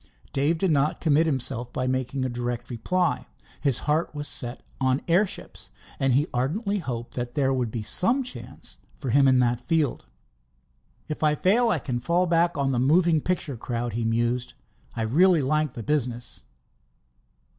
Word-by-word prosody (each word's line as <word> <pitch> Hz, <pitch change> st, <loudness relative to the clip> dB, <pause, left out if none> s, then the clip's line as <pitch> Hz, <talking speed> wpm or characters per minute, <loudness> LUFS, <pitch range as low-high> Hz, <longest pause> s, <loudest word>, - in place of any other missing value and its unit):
Dave 145 Hz, +4 st, +2 dB
did 185 Hz, +1 st, +1 dB
not 145 Hz, 0 st, +1 dB
commit 160 Hz, 0 st, +3 dB
himself 125 Hz, -4 st, -1 dB
by 130 Hz, -2 st, -2 dB
making 130 Hz, +1 st, -1 dB
a -, -, +1 dB
direct 120 Hz, 0 st, -4 dB
reply. 175 Hz, +10 st, -1 dB, 0.3 s
His 135 Hz, -5 st, +2 dB
heart 155 Hz, +1 st, 0 dB
was 145 Hz, 0 st, -3 dB
set 120 Hz, 0 st, 0 dB, 0.2 s
on 130 Hz, 0 st, +1 dB
airships, 180 Hz, +4 st, 0 dB, 0.3 s
and 135 Hz, -2 st, +2 dB
he 140 Hz, +4 st, +3 dB
ardently 200 Hz, -, -1 dB
hoped 120 Hz, -7 st, -5 dB, 0.2 s
there 135 Hz, -2 st, +2 dB
would 125 Hz, -3 st, -1 dB
be 110 Hz, -1 st, -4 dB
some 235 Hz, -, +4 dB
chance 250 Hz, -, -7 dB, 0.2 s
for 130 Hz, -5 st, -4 dB
him 140 Hz, +2 st, +5 dB
in 130 Hz, -1 st, +5 dB
that 120 Hz, 0 st, +1 dB
field. 155 Hz, -, -1 dB, 1.0 s
"If 155 Hz, -, -5 dB
I 150 Hz, -1 st, +3 dB
fail, 225 Hz, +9 st, +3 dB
I -, -, +2 dB
can 125 Hz, -3 st, -3 dB
fall 170 Hz, +8 st, +1 dB
back 170 Hz, -1 st, +2 dB
on 135 Hz, -1 st, +1 dB
the 125 Hz, -, 0 dB
moving 160 Hz, +4 st, +3 dB
picture 155 Hz, -7 st, -2 dB
crowd," 120 Hz, 0 st, -3 dB
he 115 Hz, +1 st, -2 dB
mused. 120 Hz, +2 st, -1 dB, 0.4 s
"I 115 Hz, -, -2 dB
really 160 Hz, +7 st, +4 dB
like 150 Hz, 0 st, 0 dB
the 115 Hz, -, -6 dB
business." 125 Hz, -3 st, -2 dB
135 Hz, 165 wpm, -25 LUFS, 120-165 Hz, 1.0 s, him